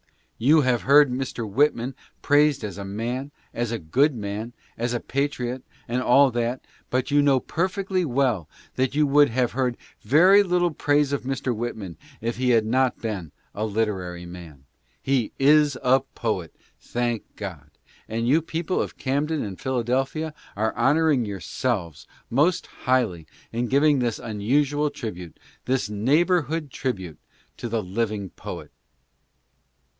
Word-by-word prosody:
You 150 +7 +5
have 125 -3 +1
heard 145 0 +6
Mr. 125 -3 -3
Whitman 130 +2 +1 0.3
praised 145 -3 +3
as 100 -2 -5
a - - -4
man, 120 +7 -3 0.2
as 120 -1 -2
a 115 - -1
good 130 - +2
man, 105 +2 -5 0.2
as 120 +1 -2
a - - 0
patriot 130 -2 -2 0.3
and 125 +1 -1
all 135 +2 +5
that, 120 +2 -2 0.2
but 130 +3 -1
you 145 0 +5
know 140 -2 +4
perfectly 185 +4 -1
well 125 - 0 0.2
that 130 +1 0
you 150 0 +4
would 145 +1 +5
have 120 +1 0
heard 125 -1 -1 0.2
very 185 +8 +6
little 180 -2 +1
praise 145 -1 +1
of 140 - 0
Mr. 130 -1 -2
Whitman 110 -6 -5 0.2
if 115 +1 -3
he 125 0 +1
had 115 -3 +4
not 130 +3 +2
been 95 -9 -4 0.2
a 105 - -3
literary 100 -5 -2
man. 85 -6 -11 0.3
He 135 -4 0
is 145 0 +4
a 130 +1 +5
poet, 110 - -4 0.2
thank 120 -2 -3
God! 85 -8 -7 0.4
and 115 +2 -1
you 150 +6 +4
people 165 +3 -2
of - - -5
Camden 145 +3 -1
and 100 -3 -7
Philadelphia 130 +5 -1 0.2
are 110 +2 -1
honoring 150 -4 +3
yourselves 100 - -3 0.2
most 160 +8 +2
highly 110 -11 -1 0.2
in 120 +2 -1
giving 140 +2 +4
this 120 -3 0
unusual 140 +7 0
tribute, 90 - -7 0.3
this 130 -4 0
neighborhood 150 - +1
tribute, 95 - -4 0.4
to 120 - -5
the 115 -1 -1
living 100 0 -2
poet. - - -8
125 Hz, 145 wpm, -24 LUFS, 110-145 Hz, 0.4 s, heard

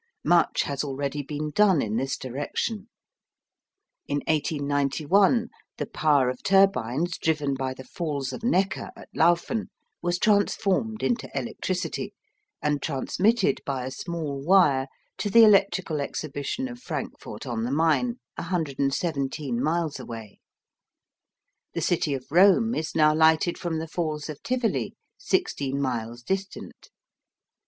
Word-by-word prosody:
Much 175 -1 +3
has 140 0 -2
already 140 0 -3
been 150 +2 -4
done 195 -2 +4
in 110 -4 -1
this 135 +3 -1
direction. 145 - -4 1.2
In 145 0 -1
1891 155 - +2 0.3
the - - -2
power 145 -4 +2
of 125 0 -3
turbines 175 - +2
driven 150 -3 0
by 130 -1 -3
the 130 - -10
Falls 140 -2 -4
of - - -6
Neckar 195 -6 0
at - - -13
Lauffen 175 +6 +2 0.3
was 175 0 0
transformed 210 +2 +1
into 240 -1 0
electricity, 185 -5 -3 0.5
and 150 -1 +1
transmitted 195 - +1
by 130 -2 -3
a 130 - -4
small 150 -2 -4
wire 150 -7 +4 0.3
to 205 - -1
the 230 +3 +7
Electrical 195 -7 +4
Exhibition 145 - -3
of 245 -1 -9
Frankfort 150 - -6
on 115 -3 -2
the 120 - -1
Main, 165 - +2 0.2
117 140 -5 -1
miles 160 -2 0
away. 115 -4 -9 1.4
The - - -1
city 160 -5 +1
of 130 -1 -7
Rome 200 +6 +5
is 160 -5 -3
now 155 -1 +5
lighted 160 +2 +4
from 170 -2 -3
the 160 +1 -4
Falls 155 -2 -3
of 150 - -7
Tivoli, 250 -2 -1 0.2
16 140 - -1
miles 120 -3 -3
distant. 195 +6 -5
155 Hz, 130 wpm, -26 LUFS, 140-190 Hz, 1.4 s, the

